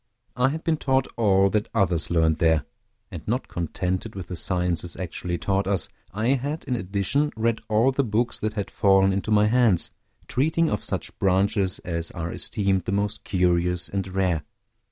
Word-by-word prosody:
I 125 +2 +3
had 160 +3 -4
been 160 -1 +1
taught 130 -2 +1
all 100 -3 +3
that 105 -1 0
others 90 -4 +1
learned 80 -2 +2
there; 80 -3 +3 0.5
and - - -6
not 125 +5 -1
contented 90 +5 -3
with 95 -3 -7
the 90 - -4
sciences 90 -2 0
actually 90 -1 -4
taught 95 +2 0
us, 95 -4 +1 0.2
I 110 +5 -1
had, 140 +4 -1
in 130 -4 -2
addition, 105 +8 0
read 115 0 0
all 110 +5 +3
the 140 +1 +1
books 115 +1 0
that 110 0 -2
had 100 -3 -3
fallen 95 -1 +4
into 100 +2 -2
my 105 -1 +4
hands, 110 -6 +3 0.4
treating 160 +5 +1
of 105 - -2
such - - -3
branches 95 0 +2
as 85 -2 -2
are 85 0 -5
esteemed 95 -4 0
the - - -2
most 100 +2 -1
curious 90 -2 +1
and 95 -1 -3
rare. 95 -4 0
100 Hz, 175 wpm, -24 LUFS, 90-115 Hz, 0.5 s, fallen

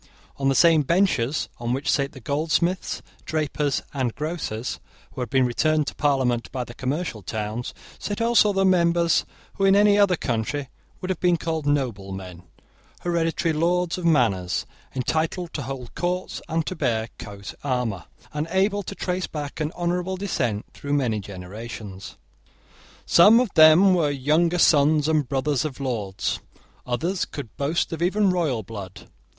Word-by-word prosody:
On 135 0 +1
the 135 - +2
same 165 -1 +6
benches 155 -4 +1
on 120 0 -1
which 135 +2 -3
sate 140 -1 +1
the 135 - -10
goldsmiths, 160 +7 -1 0.2
drapers, 150 -2 -1
and 130 -5 -1
grocers, 150 -7 -4 0.3
who - - -6
had 125 - -3
been 130 -1 +3
returned 155 +5 +1
to - - -4
parliament 130 -5 +1
by 125 -1 -2
the 120 - -10
commercial 130 -2 -3
towns, 110 +4 -4 0.3
sate 205 - -4
also 230 -2 +4
members 170 -2 +3 0.3
who, 195 - -1
in 195 0 +6
any 205 0 +5
other 200 -3 +5
country, 130 +1 -2 0.3
would 185 - -2
have 185 - -3
been 175 -1 +3
called 160 -3 -3
noblemen, 95 -10 -2 0.6
hereditary 165 -1 0
lords 175 +2 +1
of - - -6
manors, 110 - +2 0.3
entitled 160 +6 -1
to 145 - -3
hold 130 -1 -6
courts 180 +1 -2
and 160 0 0
to 185 - -4
bear 115 -8 0
coat 100 -2 -8
armour, 125 - -1 0.3
and 150 +1 -2
able 195 +3 +1
to 200 +1 -7
trace 180 -1 -2
back 145 -1 -6
an 155 0 -1
honourable 180 +2 -1
descent 125 - -2
through 140 0 -4
many 125 -7 +1
generations. 100 +1 -8 0.9
Some 210 +7 +7
of 245 -6 0
them 160 +5 +7
were 165 -5 +2
younger 155 +5 +2
sons 150 -2 +4
and 155 -4 +1
brothers 140 0 0
of 145 -4 -5
lords. 110 -8 -2 0.5
Others 170 +10 -1
could 135 -8 -8
boast 155 +4 -1
of 165 - -5
even 195 +2 +3
royal 155 -11 0
blood. 100 -3 -9
150 Hz, 155 wpm, -24 LUFS, 120-175 Hz, 0.9 s, Some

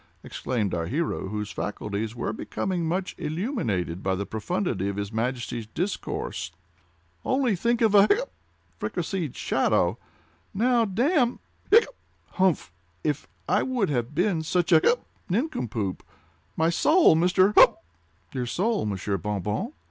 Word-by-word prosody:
exclaimed 110 -7 -2
our 85 -1 -1
hero, 150 - -2
whose 105 +1 -4
faculties 105 +2 -4
were 120 -2 -2
becoming 175 - -2
much 185 +3 -2
illuminated 150 - -2
by 95 -1 0
the 100 +2 -3
profundity 110 - -2
of 100 - -4
his 100 0 -4
Majesty's 115 -1 -3
discourse. 180 - -3 0.7
"Only 260 -5 +1
think 235 +6 0
of 220 -3 +4
a 200 0 +7
hiccup!—fricasséed 90 - -3
shadow!! - - +1 0.6
Now, 235 +2 +3
damme!—hiccup!—humph! 240 - 0 0.3
If 150 -1 -1 0.2
I - - +3
would 245 - 0
have 125 +1 -2
been 180 -1 +1
such 175 +2 0
a—hiccup!—nincompoop! 155 - 0 0.6
My 160 +1 +3
soul, 315 - +5
Mr.—humph!" 185 +4 +5 0.6
"Your 125 -2 -2
soul, 205 - 0
Monsieur 100 0 -2
Bon 105 +2 -2
Bon?" 105 - -2
160 Hz, 120 wpm, -26 LUFS, -, 0.7 s, a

